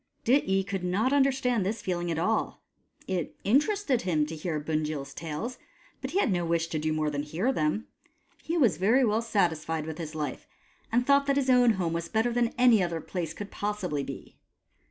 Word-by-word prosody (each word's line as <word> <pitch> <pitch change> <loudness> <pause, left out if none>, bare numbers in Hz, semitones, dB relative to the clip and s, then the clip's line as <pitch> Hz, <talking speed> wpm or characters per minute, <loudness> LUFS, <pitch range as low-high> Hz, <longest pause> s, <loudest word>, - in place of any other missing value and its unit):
Dityi 195 -7 +3
could 195 -2 -3
not 205 +9 +1
understand 265 -5 +2
this 205 +2 -3
feeling 175 -2 -2
at 165 - -1
all. 215 +7 -1 0.4
It 180 -4 -2
interested 285 - +2
him 160 -5 +1
to 160 +2 -6
hear 155 0 -3
Bunjil's 150 -2 -3
tales, 165 +10 -5 0.4
but - - -4
he 375 - -2
had 260 - +2
no 175 -2 +1
wish 165 0 +1
to 155 - -2
do 155 +1 -1
more 155 -1 0
than 145 -1 -2
hear 170 - -1
them. 155 +7 0 0.6
He 335 +2 -2
was 230 - +3
very 230 +9 +4
well 220 0 +1
satisfied 165 -8 0
with 160 +1 -6
his 155 -1 -6
life, 150 -4 -4 0.4
and 245 +2 +2
thought 280 +1 +4
that 275 0 +2
his 265 -2 +2
own 245 -2 +5
home 175 -4 -1
was 170 0 -3
better 225 +2 +1
than 240 0 +2
any 245 -4 +6
other 170 -2 -1
place 165 -1 -4
could 205 -1 -7
possibly 205 -8 -2
be. 135 -1 -8
190 Hz, 195 wpm, -28 LUFS, 160-240 Hz, 0.6 s, any